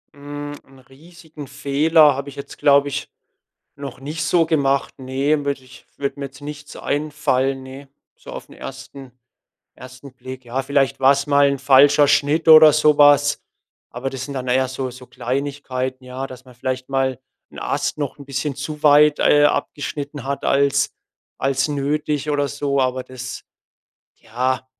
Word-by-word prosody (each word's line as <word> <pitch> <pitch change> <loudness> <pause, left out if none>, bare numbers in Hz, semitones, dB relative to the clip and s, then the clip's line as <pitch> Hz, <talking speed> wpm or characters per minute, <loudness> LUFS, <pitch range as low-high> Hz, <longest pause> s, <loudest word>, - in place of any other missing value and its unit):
Hm, 145 0 -7
'n 135 0 -19
riesigen 150 +2 -14
Fehler 150 +3 +3
habe 140 +1 -5
ich 140 - -12
jetzt, 140 - -10
glaube 140 0 +4
ich, 140 - -4 0.7
noch 140 -2 -8
nicht 150 +3 -5
so 165 +1 +2
gemacht. 140 -4 0
Ne, 140 +3 -1
würde 140 -2 -3
ich 130 0 -16
würde 140 0 -4
mir 140 - -3
jetzt 135 +1 -15
nichts 150 0 -9
einfallen, 135 -3 -1
ne, 135 +1 -11 0.3
so - - -13
aufn - - -9
1- 135 -2 -10 0.7
1. 130 +1 -12
Blick. 130 0 -10
Ja, 125 +2 -3
vielleicht 135 -3 0
war's 140 +1 +4
mal 140 -1 +4
'n 140 - -1
falscher 140 +2 +5
Schnitt 150 +3 +2
oder 155 -1 +9
so 150 -1 +3
was. 145 0 +5 0.5
Aber 130 +2 -4
das 130 -1 -6
sind 140 - -7
dann 130 -1 -4
eher 130 +1 +2
so 130 0 -4
so 125 +1 -12
Kleinigkeiten, 130 0 -4
ja, 130 +1 -6
dass 130 -1 -12
man 130 -1 -16
vielleicht 130 +1 -4
mal 135 -1 0 0.3
'n - - -11
Ast - - -2
noch 145 -3 -4
'n 140 - -11
bisschen 135 +1 -3
zu 150 +2 -7
weit, 150 0 +5
äh, 145 0 +5
abgeschnitten 145 -1 -3
hat 140 0 -3
als 140 0 +2 0.5
als 135 +1 0
nötig 145 +1 -2
oder 145 -1 0
so. 145 -1 -1
Aber 130 0 -1
das, 130 0 -8 0.7
ja, 130 +3 -3
140 Hz, 165 wpm, -20 LUFS, 130-145 Hz, 0.7 s, oder